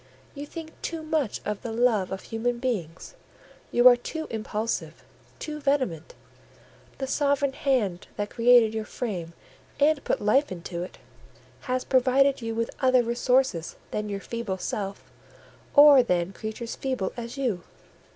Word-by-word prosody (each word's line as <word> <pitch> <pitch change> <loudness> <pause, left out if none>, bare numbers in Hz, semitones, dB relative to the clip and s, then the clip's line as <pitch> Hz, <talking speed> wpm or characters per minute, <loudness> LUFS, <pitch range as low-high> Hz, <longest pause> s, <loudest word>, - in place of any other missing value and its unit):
you 290 0 -7
think 325 0 -8
too 330 -2 -4
much 310 -7 -1
of 210 -1 -3
the 230 - -5
love 225 -5 +2
of 190 - -5
human 235 +2 -2
beings; 205 -10 -4 0.6
you 240 +1 +6
are 250 - +9
too 315 +6 -5
impulsive, 210 - -3 0.3
too 300 -1 -6
vehement; 260 - -1 0.8
the 270 - -3
sovereign 280 0 +1
hand 225 -12 0
that 205 0 -3
created 235 -2 +5
your 220 0 -2
frame, 185 -7 -5 0.5
and 290 0 +3
put - - 0
life 265 +7 +2
into 170 -1 -5
it, 180 - -7 0.6
has 255 -1 -2
provided 265 +1 +3
you 225 -1 -3
with 230 0 -1
other 255 -2 +4
resources 240 -6 +1 0.2
than 210 0 -3
your 200 -1 -3
feeble 230 -2 -4
self, 195 +1 -5 0.6
or 285 -2 +9
than 180 -5 0
creatures 220 +2 -6
feeble 260 -8 -2
as 235 +2 -7
you. 240 -10 -1
235 Hz, 145 wpm, -26 LUFS, 205-270 Hz, 0.8 s, are